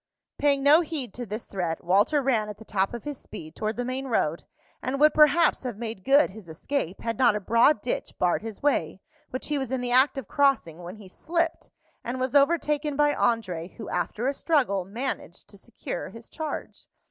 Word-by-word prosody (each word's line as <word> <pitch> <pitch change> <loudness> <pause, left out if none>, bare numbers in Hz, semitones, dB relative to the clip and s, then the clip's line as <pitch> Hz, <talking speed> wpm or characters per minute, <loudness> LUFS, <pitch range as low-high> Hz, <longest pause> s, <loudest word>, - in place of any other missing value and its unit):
Paying 280 -2 +2
no 300 +4 +7
heed 295 - -4
to 245 -1 -6
this 215 +3 -5
threat, 175 -4 -3
Walter 205 - +3
ran 225 -5 +1
at 210 - -7
the 220 - -13
top 195 +2 0
of 235 - -7
his 290 -2 -6
speed 155 -1 -10
toward 215 +1 -3
the 245 - -2
main 260 +2 -3
road, 170 -9 0 0.4
and 270 +2 -2
would 305 +1 +6
perhaps 310 +2 +5
have 245 -5 -5
made 220 -4 -6
good 280 -1 +4
his 200 -4 -12
escape 185 - -3
had 230 -2 -3
not 240 -5 +5
a - - 0
broad 230 +4 +3
ditch 245 - -3
barred 180 -1 +1
his 225 +1 -8
way, 185 - +1 0.3
which 255 - -4
he 295 -1 0
was 265 -2 -4
in 260 - 0
the 245 0 -3
act 260 +3 +4
of 270 - -5
crossing, 275 - +1
when 175 +3 -8
he 210 -3 -13
slipped, 335 - -2 0.3
and 250 +2 -4
was 255 0 -1
overtaken 295 0 +2
by 295 0 +3
André, 190 - -1
who, 220 - -8
after 230 - -2
a 275 - +1
struggle, 255 - +1
managed 240 +8 -5
to - - -13
secure - - -6
his 230 0 -12
charge. 315 -2 -6
245 Hz, 205 wpm, -26 LUFS, 205-285 Hz, 0.4 s, no